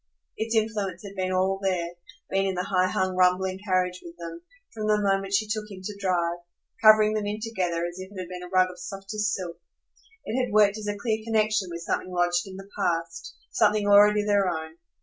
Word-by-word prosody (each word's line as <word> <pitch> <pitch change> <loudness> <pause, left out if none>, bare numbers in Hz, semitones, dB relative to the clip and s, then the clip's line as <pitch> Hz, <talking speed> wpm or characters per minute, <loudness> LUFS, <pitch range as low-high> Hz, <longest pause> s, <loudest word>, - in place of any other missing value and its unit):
Its 225 +1 -2
influence 210 -5 -1
had 200 -1 -9
been 185 -1 -1
all 190 +1 +1
there, 180 -3 0 0.4
been 195 0 +2
in 190 - -1
the 180 - -1
high 185 -1 +2
hung, 185 -1 -1
rumbling 185 +1 +2
carriage 185 -2 0
with 170 0 -11
them, 170 0 -8 0.3
from 215 -1 -3
the 210 0 +3
moment 195 -1 0
she 200 +2 +2
took 215 0 -3
him 195 -2 -9
to 210 +2 -5
drive, 175 -3 0 0.4
covering 215 -1 +7
them 210 -1 -1
in 210 +1 -3
together 180 -7 -2
as 175 +1 -6
if 190 +1 -8
it 200 - -8
had 180 - -5
been 180 0 -7
a 180 - -7
rug 185 0 +3
of 180 - -14
softest 195 +3 -3
silk. 175 -2 -7 0.6
It 255 +3 0
had 250 - -3
worked 210 0 +4
as 210 - -6
a 205 0 -2
clear 220 +1 -1
connexion 215 -3 +1
with 170 0 -6
something 185 - -2
lodged 175 0 +1
in 190 - -9
the 195 0 -10
past, 165 - -2 0.2
something 210 -1 +2
already 205 +1 +6
their 200 -2 +3
own. 160 -1 -5
195 Hz, 215 wpm, -26 LUFS, 180-210 Hz, 0.6 s, covering